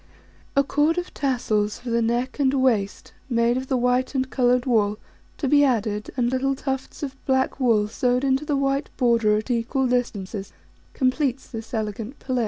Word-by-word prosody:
A 280 Hz, -, +5 dB
cord 295 Hz, +4 st, +1 dB
of 355 Hz, 0 st, -3 dB
tassels 215 Hz, -6 st, 0 dB
for 245 Hz, -1 st, -6 dB
the 235 Hz, 0 st, +2 dB
neck 240 Hz, +4 st, -1 dB
and 270 Hz, -2 st, +3 dB
waist, 230 Hz, -7 st, 0 dB, 0.2 s
made 235 Hz, 0 st, +2 dB
of 260 Hz, +1 st, -3 dB
the 260 Hz, -, +1 dB
white 250 Hz, +2 st, +1 dB
and 260 Hz, 0 st, +1 dB
coloured 250 Hz, -1 st, +2 dB
wool, 215 Hz, -5 st, +2 dB, 0.4 s
to 280 Hz, -, -2 dB
be 290 Hz, +2 st, +5 dB
added, 215 Hz, -5 st, 0 dB
and 240 Hz, -1 st, +1 dB
little 270 Hz, +1 st, 0 dB
tufts 270 Hz, +1 st, -4 dB
of 270 Hz, -1 st, -6 dB
black 265 Hz, +1 st, +1 dB
wool 225 Hz, -5 st, +3 dB
sewed 250 Hz, +3 st, 0 dB
into 270 Hz, +1 st, +2 dB
the 295 Hz, -2 st, 0 dB
white 275 Hz, +1 st, 0 dB
border 230 Hz, -4 st, +3 dB
at 215 Hz, +4 st, -3 dB
equal 245 Hz, +3 st, 0 dB
distances, 210 Hz, -5 st, -2 dB, 0.4 s
completes 260 Hz, 0 st, 0 dB
this 225 Hz, -1 st, -8 dB
elegant 220 Hz, +2 st, -4 dB
pelisse. 255 Hz, -2 st, -2 dB
250 Hz, 180 wpm, -24 LUFS, 230-270 Hz, 0.4 s, A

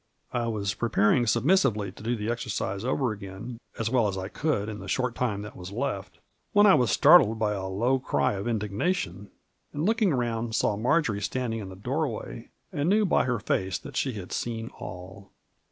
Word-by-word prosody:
I 120 Hz, -1 st, 0 dB
was 100 Hz, -3 st, -1 dB
preparing 115 Hz, +2 st, +2 dB
submissively 115 Hz, -, +2 dB
to -, -, -14 dB
do 115 Hz, +3 st, -1 dB
the 110 Hz, +1 st, -2 dB
exercise 110 Hz, -4 st, -3 dB
over 130 Hz, -1 st, 0 dB
again 100 Hz, +3 st, -7 dB, 0.2 s
as 115 Hz, -, -1 dB
well 120 Hz, -4 st, +3 dB
as 95 Hz, -1 st, -3 dB
I 95 Hz, 0 st, -4 dB
could 135 Hz, -9 st, -1 dB
in 105 Hz, -1 st, -5 dB
the -, -, -8 dB
short 125 Hz, -2 st, 0 dB
time 105 Hz, -5 st, -1 dB
that 105 Hz, -, -9 dB
was 90 Hz, +1 st, -8 dB
left, 105 Hz, -4 st, -3 dB, 0.4 s
when 205 Hz, 0 st, +6 dB
I 200 Hz, -, +8 dB
was 125 Hz, -, +3 dB
startled 140 Hz, -, +6 dB
by 105 Hz, -2 st, +1 dB
a 95 Hz, -2 st, -3 dB
low 120 Hz, +8 st, +1 dB
cry 125 Hz, -, +1 dB
of 100 Hz, +2 st, -4 dB
indignation, 105 Hz, -, -2 dB, 0.4 s
and 150 Hz, +3 st, -2 dB
looking 220 Hz, -2 st, +3 dB
round, 120 Hz, -3 st, -1 dB
saw 105 Hz, -, +2 dB
Marjory 120 Hz, -2 st, +1 dB
standing 120 Hz, -1 st, -2 dB
in 100 Hz, -3 st, -6 dB
the 95 Hz, -, -9 dB
doorway, 120 Hz, -, -3 dB, 0.2 s
and 145 Hz, +4 st, 0 dB
knew 210 Hz, +2 st, +4 dB
by 180 Hz, -, +3 dB
her 125 Hz, -2 st, 0 dB
face 95 Hz, -3 st, -1 dB
that -, -, -11 dB
she 130 Hz, -, 0 dB
had 95 Hz, -4 st, -7 dB
seen 115 Hz, -1 st, -3 dB
all. 95 Hz, +2 st, -9 dB
115 Hz, 195 wpm, -27 LUFS, 100-130 Hz, 0.4 s, I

